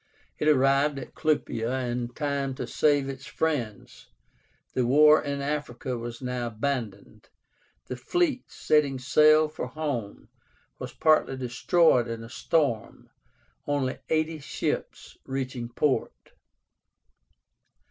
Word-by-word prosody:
It 150 Hz, -, 0 dB
arrived 140 Hz, 0 st, +3 dB
at 135 Hz, -, -8 dB
Clupea 130 Hz, -5 st, -1 dB
in 120 Hz, 0 st, -2 dB
time 140 Hz, -2 st, -2 dB
to 125 Hz, -, -4 dB
save 145 Hz, +3 st, +2 dB
its 135 Hz, 0 st, -7 dB
friends. 130 Hz, -11 st, -3 dB, 0.7 s
The 130 Hz, -, +1 dB
war 150 Hz, +5 st, +6 dB
in 140 Hz, -1 st, -3 dB
Africa 140 Hz, -3 st, -3 dB
was 120 Hz, +1 st, -7 dB
now 125 Hz, -1 st, -2 dB
abandoned. 115 Hz, -3 st, -4 dB, 0.6 s
The -, -, -5 dB
fleet, 280 Hz, -, -1 dB
setting 145 Hz, -3 st, +1 dB
sail 155 Hz, +4 st, +5 dB
for 155 Hz, -4 st, -6 dB
home, 125 Hz, -7 st, -4 dB, 0.5 s
was -, -, -6 dB
partly 155 Hz, -4 st, +2 dB
destroyed 130 Hz, +1 st, +2 dB
in 115 Hz, -1 st, -5 dB
a 115 Hz, -, -10 dB
storm, 140 Hz, -3 st, -1 dB, 0.6 s
only 140 Hz, -3 st, -1 dB
eighty 160 Hz, 0 st, 0 dB
ships 140 Hz, -, -4 dB
reaching 130 Hz, -3 st, -4 dB
port. 130 Hz, +3 st, -1 dB
135 Hz, 115 wpm, -27 LUFS, 125-150 Hz, 0.7 s, war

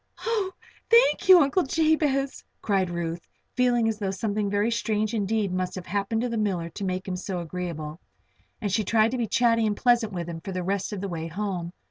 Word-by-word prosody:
"Oh, 435 Hz, -5 st, 0 dB, 0.4 s
thank 470 Hz, -4 st, +4 dB
you, 370 Hz, -1 st, +10 dB
Uncle 290 Hz, +6 st, +3 dB
Jabez!" 295 Hz, -3 st, +1 dB, 0.2 s
cried 195 Hz, -3 st, +1 dB
Ruth, 170 Hz, -1 st, -4 dB, 0.3 s
feeling 245 Hz, -2 st, +3 dB
as 220 Hz, -1 st, -1 dB
though 200 Hz, -2 st, -1 dB
something 205 Hz, +1 st, -1 dB
very 205 Hz, +3 st, +1 dB
strange 215 Hz, -1 st, 0 dB
indeed 210 Hz, -2 st, 0 dB
must 185 Hz, 0 st, -2 dB
have 185 Hz, -2 st, -6 dB
happened 200 Hz, +4 st, -1 dB
to 245 Hz, -, -1 dB
the 230 Hz, -1 st, -2 dB
miller 185 Hz, -6 st, -1 dB
to 200 Hz, -, -7 dB
make 185 Hz, 0 st, -2 dB
him 185 Hz, -, -2 dB
so 180 Hz, 0 st, -4 dB
agreeable. 165 Hz, -2 st, -5 dB, 0.6 s
And 205 Hz, -, -2 dB
she 215 Hz, +3 st, +1 dB
tried 220 Hz, +2 st, +3 dB
to 255 Hz, -, -2 dB
be 230 Hz, -, 0 dB
chatty 230 Hz, 0 st, +3 dB
and 205 Hz, -1 st, -1 dB
pleasant 240 Hz, -3 st, +3 dB
with 175 Hz, -3 st, -4 dB
him 165 Hz, -1 st, -6 dB
for 190 Hz, -, -6 dB
the 180 Hz, 0 st, -2 dB
rest 195 Hz, +2 st, -1 dB
of 205 Hz, -3 st, -4 dB
the 200 Hz, -, -2 dB
way 165 Hz, -3 st, -4 dB
home. 180 Hz, -1 st, -3 dB
205 Hz, 210 wpm, -26 LUFS, 180-235 Hz, 0.6 s, you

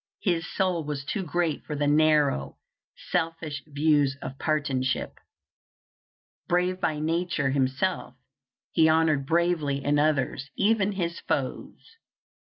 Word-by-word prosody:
His 170 Hz, -5 st, 0 dB
soul 185 Hz, -4 st, 0 dB
was 145 Hz, -1 st, -4 dB
too 195 Hz, -, -2 dB
great 170 Hz, -1 st, -1 dB
for 150 Hz, -, -5 dB
the 145 Hz, 0 st, 0 dB
narrow, 145 Hz, -, +2 dB, 0.5 s
selfish 160 Hz, -3 st, -2 dB
views 145 Hz, -2 st, +2 dB
of 135 Hz, -, -7 dB
partisanship. 140 Hz, -4 st, -1 dB, 1.3 s
Brave 180 Hz, +1 st, +1 dB
by 155 Hz, -, 0 dB
nature 160 Hz, -2 st, 0 dB
himself, 135 Hz, +2 st, -1 dB, 0.6 s
he 160 Hz, 0 st, +4 dB
honored 155 Hz, -3 st, +2 dB
bravery 165 Hz, -4 st, +1 dB
in 145 Hz, +1 st, +2 dB
others, 140 Hz, -2 st, 0 dB
even 205 Hz, -1 st, +2 dB
his 170 Hz, -3 st, -3 dB
foes. 455 Hz, -, -4 dB
155 Hz, 115 wpm, -26 LUFS, 140-170 Hz, 1.3 s, he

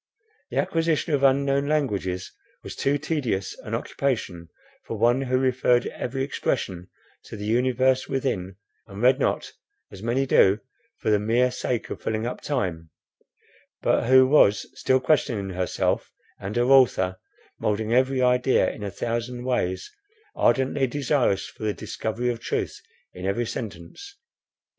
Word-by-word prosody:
The -, -, -5 dB
acquisition 165 Hz, -1 st, 0 dB
of 140 Hz, -, +2 dB
unknown 140 Hz, +1 st, +3 dB
languages 100 Hz, -12 st, -1 dB, 0.3 s
was -, -, -7 dB
too 140 Hz, +1 st, +1 dB
tedious 135 Hz, -, -2 dB
an -, -, -4 dB
occupation, 95 Hz, -11 st, -3 dB, 0.3 s
for 115 Hz, -, -5 dB
one 120 Hz, +4 st, +3 dB
who 130 Hz, -1 st, 0 dB
referred 130 Hz, -1 st, +2 dB
every 135 Hz, +2 st, -3 dB
expression 95 Hz, -9 st, -3 dB, 0.4 s
to 110 Hz, -, -9 dB
the 105 Hz, -, -6 dB
universe 130 Hz, +3 st, +2 dB
within, 105 Hz, -9 st, -2 dB, 0.3 s
and 100 Hz, -1 st, -10 dB
read 130 Hz, +2 st, +5 dB
not, -, -, -1 dB, 0.4 s
as 95 Hz, -, -11 dB
many 120 Hz, +4 st, 0 dB
do, 100 Hz, -5 st, +4 dB, 0.4 s
for 110 Hz, -, -1 dB
the 105 Hz, -, +4 dB
mere 120 Hz, +4 st, +2 dB
sake 125 Hz, -1 st, -3 dB
of -, -, -6 dB
filling 110 Hz, +1 st, -2 dB
up 120 Hz, -, -4 dB
time; 90 Hz, -, -2 dB, 0.9 s
but -, -, +2 dB
who 130 Hz, 0 st, +7 dB
was 105 Hz, -8 st, +4 dB
still 130 Hz, 0 st, +2 dB
questioning 120 Hz, -8 st, 0 dB
herself 90 Hz, -1 st, -1 dB, 0.3 s
and 100 Hz, +2 st, -5 dB
her 120 Hz, -, +3 dB
author, 120 Hz, -8 st, +4 dB, 0.4 s
moulding 110 Hz, +2 st, -1 dB
every 130 Hz, +1 st, +2 dB
idea 125 Hz, +1 st, +3 dB
in -, -, -11 dB
a 100 Hz, -, -3 dB
thousand 120 Hz, +4 st, -4 dB
ways, 95 Hz, -8 st, -1 dB, 0.4 s
ardently 135 Hz, 0 st, +2 dB
desirous 135 Hz, -7 st, +1 dB
for -, -, -14 dB
the 105 Hz, -2 st, -1 dB
discovery 115 Hz, +7 st, -3 dB
of 115 Hz, -, -5 dB
truth -, -, -3 dB, 0.3 s
in 90 Hz, +1 st, -5 dB
every 115 Hz, +5 st, 0 dB
sentence. 115 Hz, -, -7 dB
120 Hz, 145 wpm, -25 LUFS, 100-130 Hz, 0.9 s, who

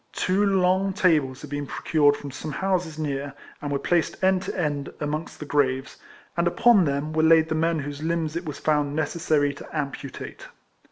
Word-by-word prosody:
Two 190 Hz, +3 st, +1 dB
long 190 Hz, 0 st, +2 dB
tables 155 Hz, -9 st, +2 dB
had 150 Hz, -, -10 dB
been 145 Hz, -1 st, -3 dB
procured 145 Hz, -1 st, +2 dB
from 140 Hz, -, -8 dB
some 155 Hz, +4 st, -6 dB
houses 180 Hz, -1 st, -1 dB
near, 140 Hz, -2 st, -3 dB, 0.3 s
and 145 Hz, -, -4 dB
were 140 Hz, -, +1 dB
placed 170 Hz, +5 st, 0 dB
end 190 Hz, 0 st, +4 dB
to 190 Hz, -, -5 dB
end 145 Hz, -4 st, -1 dB
amongst 150 Hz, +2 st, -3 dB
the 150 Hz, -, -6 dB
graves, 135 Hz, -2 st, 0 dB, 0.4 s
and 170 Hz, 0 st, +1 dB
upon 205 Hz, +1 st, +5 dB
them 140 Hz, +2 st, -2 dB
were 160 Hz, -, +2 dB
laid 160 Hz, 0 st, +5 dB
the -, -, 0 dB
men 165 Hz, +1 st, +1 dB
whose 145 Hz, 0 st, -5 dB
limbs 160 Hz, -1 st, -1 dB
it 170 Hz, +1 st, -3 dB
was 145 Hz, -, -5 dB
found 150 Hz, -2 st, 0 dB
necessary 155 Hz, -2 st, +1 dB
to 150 Hz, -, -8 dB
amputate. 140 Hz, -2 st, -6 dB
155 Hz, 185 wpm, -25 LUFS, 145-170 Hz, 0.4 s, upon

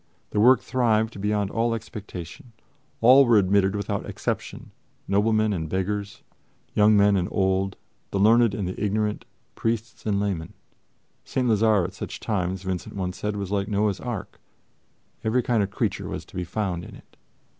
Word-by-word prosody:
The 105 Hz, -, 0 dB
work 125 Hz, +4 st, +6 dB
thrived 110 Hz, -4 st, 0 dB
beyond 105 Hz, -1 st, 0 dB
all 115 Hz, 0 st, +1 dB
expectation. 105 Hz, -1 st, -9 dB, 0.5 s
All 130 Hz, +4 st, +8 dB
were 120 Hz, -4 st, +5 dB
admitted 95 Hz, 0 st, +3 dB
without 100 Hz, -1 st, -3 dB
exception: -, -, -4 dB, 0.4 s
noblemen 110 Hz, +1 st, +2 dB
and 80 Hz, -4 st, -3 dB
beggars, 100 Hz, +2 st, -3 dB, 0.5 s
young 105 Hz, 0 st, +5 dB
men 100 Hz, 0 st, +5 dB
and 90 Hz, -2 st, 0 dB
old, 95 Hz, 0 st, 0 dB, 0.3 s
the 100 Hz, -, -2 dB
learned 115 Hz, +1 st, +5 dB
and 100 Hz, -4 st, -2 dB
the 95 Hz, +3 st, -4 dB
ignorant, 105 Hz, +1 st, -1 dB, 0.3 s
priests 115 Hz, 0 st, -3 dB
and 100 Hz, -2 st, +1 dB
laymen. 95 Hz, -6 st, -2 dB, 0.7 s
St. 130 Hz, -1 st, -1 dB
Lazare 110 Hz, -4 st, +3 dB
at 95 Hz, -, -6 dB
such -, -, -7 dB
times, 95 Hz, -3 st, -2 dB
Vincent 95 Hz, -2 st, -4 dB
once 90 Hz, -2 st, -3 dB
said, 105 Hz, +1 st, -3 dB
was 100 Hz, -2 st, -4 dB
like 100 Hz, -1 st, 0 dB
Noah's 105 Hz, -2 st, 0 dB
ark: 105 Hz, -4 st, -6 dB, 0.8 s
every 115 Hz, +3 st, +1 dB
kind 115 Hz, -3 st, +2 dB
of 100 Hz, -, -1 dB
creature 105 Hz, -, -2 dB
was -, -, -5 dB
to -, -, -17 dB
be 90 Hz, 0 st, -2 dB
found 90 Hz, -1 st, -2 dB
in -, -, -10 dB
it. -, -, -18 dB
105 Hz, 165 wpm, -25 LUFS, 95-110 Hz, 0.8 s, All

